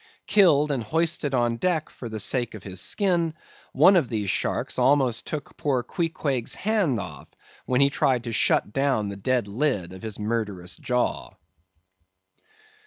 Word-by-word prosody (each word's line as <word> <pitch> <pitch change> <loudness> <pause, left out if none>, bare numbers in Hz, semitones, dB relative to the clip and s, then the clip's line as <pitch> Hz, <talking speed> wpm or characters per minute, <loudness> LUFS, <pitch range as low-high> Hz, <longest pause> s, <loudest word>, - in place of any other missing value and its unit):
Killed 150 -8 +4
and 135 -4 -1
hoisted 155 +2 0
on 120 -1 +1
deck 160 +3 0
for 120 - -8
the 110 -1 -5
sake 120 +2 0
of 105 - -10
his 95 -2 -5
skin, 170 - 0 0.4
one 175 +8 +6
of 160 -9 +2
these 105 -5 -1
sharks - - -2
almost 130 -2 +2
took 150 -2 -6
poor 130 -4 0
Queequeg's 140 -4 -2
hand 195 - 0
off, - - -8 0.4
when 130 +1 +2
he 140 - +5
tried 130 -3 +1
to 115 - -4
shut 105 - +2
down 135 -7 +1
the 100 - -5
dead 120 +3 0
lid 100 - -1
of 95 - -10
his 110 -2 -5
murderous 105 -5 -3
jaw. 125 0 -2
125 Hz, 160 wpm, -25 LUFS, 110-150 Hz, 0.4 s, one